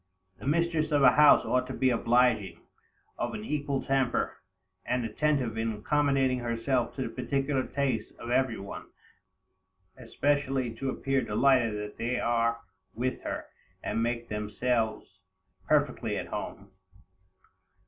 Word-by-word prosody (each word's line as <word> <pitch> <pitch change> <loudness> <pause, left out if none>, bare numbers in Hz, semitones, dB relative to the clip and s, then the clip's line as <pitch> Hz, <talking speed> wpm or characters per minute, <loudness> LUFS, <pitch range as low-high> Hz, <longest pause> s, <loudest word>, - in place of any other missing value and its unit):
The - - -7
mistress 165 0 +1
of 145 -2 +3
a 125 - +8
house 150 +2 +6
ought 125 0 +1
to 130 - -5
be 130 -1 +2
obliging, 115 -7 +2 0.6
of - - -2
an 215 0 -6
equal 140 - -2
temper, 135 -2 0 0.4
and 125 -1 -1
attentive 125 -1 0
in 115 0 0
accommodating 135 +2 +1
herself 120 +1 -1
to 130 - -2
the - - -4
particular 135 +1 -1
tastes 130 -6 -1
of 120 - -6
every 130 -2 +2
one, 100 - -8 1.1
especially 135 -4 -1
to 135 +2 -2
appear 135 0 0
delighted 120 0 +3
that 105 0 -6
they 120 +2 -1
are 115 0 +1 0.3
with 125 +2 -2
her, - - -4 0.4
and 115 - -1
make 120 0 -1
themselves 110 +2 -1 0.6
perfectly - - +1
at - - -5
home. 100 0 -6
125 Hz, 135 wpm, -29 LUFS, 115-135 Hz, 1.1 s, a